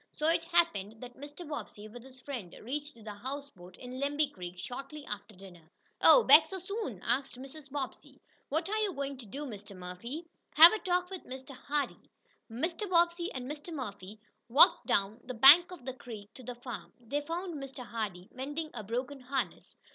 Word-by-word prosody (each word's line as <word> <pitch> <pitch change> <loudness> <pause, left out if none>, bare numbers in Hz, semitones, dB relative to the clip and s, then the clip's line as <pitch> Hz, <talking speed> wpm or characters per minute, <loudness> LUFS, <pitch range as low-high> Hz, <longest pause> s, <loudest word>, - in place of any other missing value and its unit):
So 305 - -2
it 330 0 +2
happened 225 - +1
that 245 0 -9
Mr. 290 +4 -9
Bobbsey, 215 -8 -7
with 240 +3 -11
his 260 0 -14
friend, 245 -11 -6
reached 295 +5 -4
the 220 -2 -9
houseboat, 230 -6 -8
in 250 +1 -8
Lemby 290 +1 0
Creek, 180 -1 -8
shortly 275 +9 -7
after 210 0 -7
dinner. 180 -4 -14 0.3
"Oh, - - +8
back 305 +3 +8
so 380 - -5
soon?" 370 - -5
asked 255 +2 -1
Mrs. 270 +3 -10
Bobbsey. 275 -2 -6 0.3
"What 320 +5 0
are 430 +2 0
you 415 -3 0
going 280 -2 -4
to 245 -4 -11
do, 280 +9 -6
Mr. 205 -5 -9
Murphy?" 210 - -7 0.3
"Have 330 +5 +11
a 435 - -1
talk 360 -1 0
with 375 - -7
Mr. 260 +1 -8
Hardee." 285 +2 -3 0.4
Mr. 335 - -2
Bobbsey 345 0 +2
and 255 -2 -5
Mr. 295 +5 -7
Murphy 210 - -6 0.3
walked 270 +6 +6
down 200 +3 +1
the 255 0 -6
bank 300 +9 +9
of 350 -9 -10
the 260 - -4
creek 225 -4 -10
to - - -12
the 245 0 -7
farm. 240 -2 -8
They 250 +5 -2
found 340 +4 -4
Mr. 270 -2 -8
Hardee 200 -6 -5
mending 295 +5 -4
a 215 - -6
broken 250 +6 -3
harness. 265 +1 -4
265 Hz, 185 wpm, -31 LUFS, 225-310 Hz, 0.4 s, Have